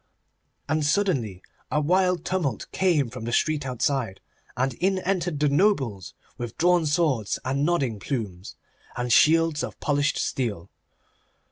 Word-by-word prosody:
And 155 +1 0
suddenly 145 - 0 0.3
a 150 - +1
wild 180 +2 +2
tumult 175 - -1
came 155 -10 +1
from 120 -2 -7
the 120 - -3
street 145 +2 +1
outside, 125 -4 -1 0.4
and 130 +1 0
in 190 +9 0
entered 180 -4 -1
the 150 - +3
nobles 140 - +1 0.2
with 120 -1 -6
drawn 175 -1 +3
swords 145 - +1
and 135 +2 0
nodding 140 -10 0
plumes, 100 -7 -5 0.4
and 120 -1 0
shields 165 +1 +4
of - - -6
polished 145 0 +1
steel. 100 -8 -2
145 Hz, 135 wpm, -25 LUFS, 120-170 Hz, 0.4 s, shields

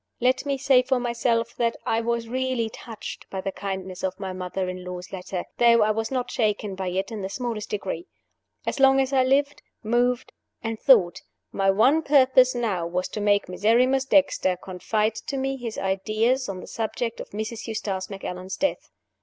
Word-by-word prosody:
Let 260 +3 +1
me 275 -1 0
say 265 -1 +5
for 255 0 0
myself 235 -1 0
that 230 -1 0
I 225 - +1
was 235 0 -1
really 255 -2 -1
touched 225 -1 -9
by 190 - -4
the 195 +1 -3
kindness 190 -2 -5
of 190 0 -2
my 190 -2 -4
mother 185 0 -3
in 185 0 -5
law's 180 0 -7
letter, 185 -1 -5
though 235 -2 +6
I 215 - +3
was 225 +1 -2
not 255 -2 -2
shaken 210 -3 0
by 190 0 -4
it 190 +3 -2
in 215 -2 -5
the 190 - -3
smallest 230 -1 -4
degree. 210 - -4 0.6
As - - -2
long 270 0 +6
as 270 0 0
I 260 -1 +5
lived, 280 +2 +1 0.2
moved, 245 +3 +1 0.3
and 225 -1 -3
thought, 205 -10 +5 0.3
my 195 -1 +1
one 245 +11 +4
purpose 260 -3 +5
now 200 -8 -1
was 180 +2 -2
to 210 - -5
make 205 -1 +2
Miserrimus 240 +8 +2
Dexter 270 -10 +3
confide 210 +4 -1
to 275 - -2
me 270 0 -1
his 240 -4 -6
ideas 215 +6 0
on 185 -2 -5
the - - -10
subject 230 +1 -3
of - - -7
Mrs. 220 +3 -5
Eustace 195 -4 -3
Macallan's 190 -1 -6
death. 290 - -1
225 Hz, 185 wpm, -25 LUFS, 195-255 Hz, 0.6 s, though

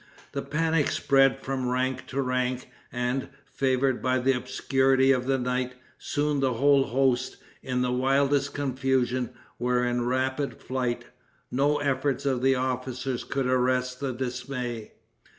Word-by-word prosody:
The 140 - -3
panic 155 +2 +1
spread 135 -1 +3
from 130 -2 -2
rank 130 +1 -1
to 135 +1 -1
rank, 125 0 -1 0.2
and, 125 +2 -2 0.2
favored 130 -1 0
by 130 0 +2
the 130 +1 +2
obscurity 135 +1 +2
of 125 -1 +1
the 135 0 +2
night, 125 0 -2 0.2
soon 145 -1 0
the 135 -2 +1
whole 140 +3 +4
host, 130 0 +1 0.2
in 125 -1 -1
the 125 - 0
wildest 140 +2 +2
confusion, 130 -3 0 0.3
were 125 0 +1
in 120 0 0
rapid 130 +2 -1
flight. 125 -2 -2 0.5
No 145 +3 +2
efforts 140 -1 0
of 130 -3 +1
the 135 0 +4
officers 130 0 -2
could 135 -1 -2
arrest 125 0 +1
the 140 -2 -2
dismay. 125 -2 -4
130 Hz, 140 wpm, -27 LUFS, 125-135 Hz, 0.5 s, whole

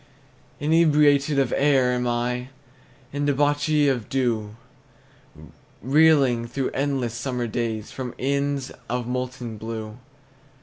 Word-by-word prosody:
Inebriate 150 -2 +4
of 135 - +1
air 135 -3 +3
am 125 0 -1
I, 125 +1 -2 0.6
And 145 0 -1
debauchee 145 +1 +2
of 125 -6 -1
dew, 115 -5 -1 1.2
Reeling, 135 -3 +3
through 130 +2 -3
endless 135 -4 -1
summer 125 0 -3
days, 115 -2 -3
From 125 -2 -6
inns 140 0 -1 0.2
of 125 0 -2
molten 125 -2 -4
blue. 110 0 -6
130 Hz, 105 wpm, -24 LUFS, 120-145 Hz, 1.2 s, Inebriate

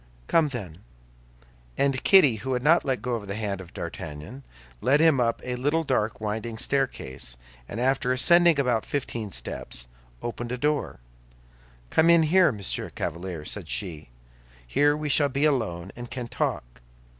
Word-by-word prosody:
"Come, 165 -2 +3
then." 100 - -7 1.0
And 135 -2 +1
Kitty, 145 - +6
who 130 +5 -3
had 125 0 -2
not 165 +4 +5
let 130 -3 -2
go 120 -3 -2
the 100 -1 -5
hand 100 -3 -3
of 90 - -12
D'Artagnan, 75 - -7 0.4
led 135 +5 +3
him 160 -4 +4
up 115 -1 0
a 125 0 -3
little 145 +6 +1
dark, 115 -7 -1
winding 110 +1 -4
staircase, 110 - -1 0.3
and 115 - -5
after 130 0 +1
ascending 170 +4 +6
about 125 -5 +1
fifteen 115 -7 -4
steps, - - -5 0.4
opened 120 0 -5
a 125 - -2
door. 150 - -1 0.9
"Come 165 +1 +4
in 170 -1 +6
here, 180 +2 +4
Monsieur 100 -4 -3
Chevalier," 85 -2 -4
said 95 -2 -3
she; 80 - -2 0.6
"here 145 - +2
we 150 0 -4
shall 145 0 +3
be 140 +3 0
alone, 100 - -1
and 120 0 -8
can 125 -2 -5
talk." - - -3
125 Hz, 155 wpm, -26 LUFS, 100-145 Hz, 1.0 s, Kitty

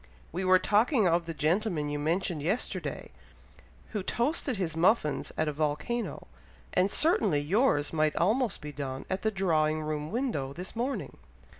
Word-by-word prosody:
We 180 +4 -3
were 185 0 +6
talking 215 - +3
of 170 0 +2
the 165 - -3
gentleman 165 0 0
you 145 - -2
mentioned 165 +1 -1
yesterday, 180 - -3 0.8
who 210 - -3
toasted 250 - 0
his 170 -4 -2
muffins 165 - +2
at 155 - +1
a 150 - -1
volcano; 155 +11 -2 0.5
and 185 +2 +3
certainly 215 - +3
yours 150 - +2
might 155 -1 +1
almost 220 +5 +1
be 150 - -6
done 135 -2 -5
at 190 - -1
the 220 - +1
drawing 155 -6 +1
room 150 0 -3
window 195 - -2
this 180 +7 -7
morning." 250 +4 -3
175 Hz, 155 wpm, -29 LUFS, 150-215 Hz, 0.8 s, were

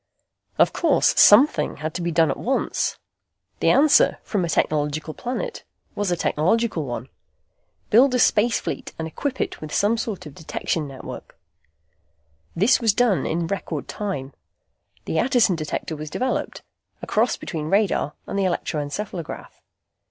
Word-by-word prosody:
Of - - +4
course, 325 -5 +3
something 250 +9 +6
had 155 +1 -5
to 180 - -4
be 170 0 -1
done 165 -1 +3
at - - -5
once. 265 +2 -1 0.6
The - - +3
answer, 290 +1 +5
from 200 -4 -1
a 170 - -2
technological 155 0 0
planet, 260 - -5 0.3
was 205 -2 -1
a 175 - +1
technological 175 +2 0
one. 120 -1 -5 0.8
Build 250 +4 +5
a - - +3
space 230 0 +3
fleet 270 0 -5
and 160 - -4
equip 265 - -4
it - - -3
with 155 -1 -7
some 215 +7 +2
sort 220 -6 -4
of 150 - -8
a - - -20
detection 155 0 -3
fire 135 -1 -10
network. - - -10 1.2
This 210 +9 +4
was 225 -3 +3
done 240 -7 +2
in 165 +1 -1
record 165 -4 -4
time. 145 -10 -4 0.7
The 160 - -2
Attison 240 -7 +3
Detector 155 0 -4
was 155 0 -7
developed, 255 +11 -3 0.4
a - - -2
cross 225 +4 +1
between 155 -2 -5
radar 195 -6 +1
and 200 - -3
the - - +1
electroencephalograph. 170 +1 -4
185 Hz, 155 wpm, -23 LUFS, 155-235 Hz, 1.2 s, something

